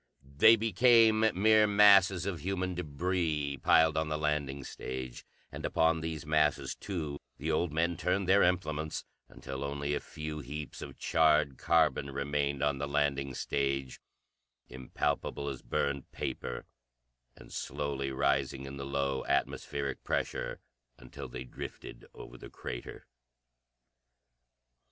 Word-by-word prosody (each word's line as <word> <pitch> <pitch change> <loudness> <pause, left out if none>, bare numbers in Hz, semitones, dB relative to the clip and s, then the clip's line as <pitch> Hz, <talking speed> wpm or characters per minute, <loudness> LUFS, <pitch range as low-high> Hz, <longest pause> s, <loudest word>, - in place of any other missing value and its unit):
They 110 +10 +8
became 115 0 +5 0.2
mere 110 +2 +5
masses 100 -3 +6
of 95 -4 -3
human 90 +1 -2
débris 80 -3 -1
piled 80 -1 +5
on 80 0 0
the 75 - -1
landing 75 -3 -1
stage, 65 -1 -6 0.3
and - - -7
upon 80 0 +2
these 80 -2 -4
masses, 75 -3 +1
too, 80 -7 -5 0.2
the 80 +4 -2
old 80 +1 0
men 85 +2 0
turned 95 +1 0
their 100 +2 +5
implements, 80 -4 0 0.2
until 65 0 -7
only 70 +1 -2
a - - 0
few 75 0 -6
heaps 75 +2 -7
of - - -8
charred 75 -3 +2
carbon 70 - +2
remained 70 0 -1
on 70 -2 +1
the 70 - -2
landing 70 -2 0
stage, 70 -1 -2 0.7
impalpable 65 +2 -3
as 65 - -6
burned 70 -2 -2
paper, 60 - -4 0.7
and - - -14
slowly 70 0 -3
rising 70 0 0
in 70 0 -7
the 70 0 -5
low 70 -1 -1
atmospheric 70 -1 -1
pressure - - -2 0.4
until 60 - -9
they - - -7
drifted 65 - -9
over - - -11
the - - -10
crater. - - -7
75 Hz, 130 wpm, -31 LUFS, 70-85 Hz, 0.7 s, They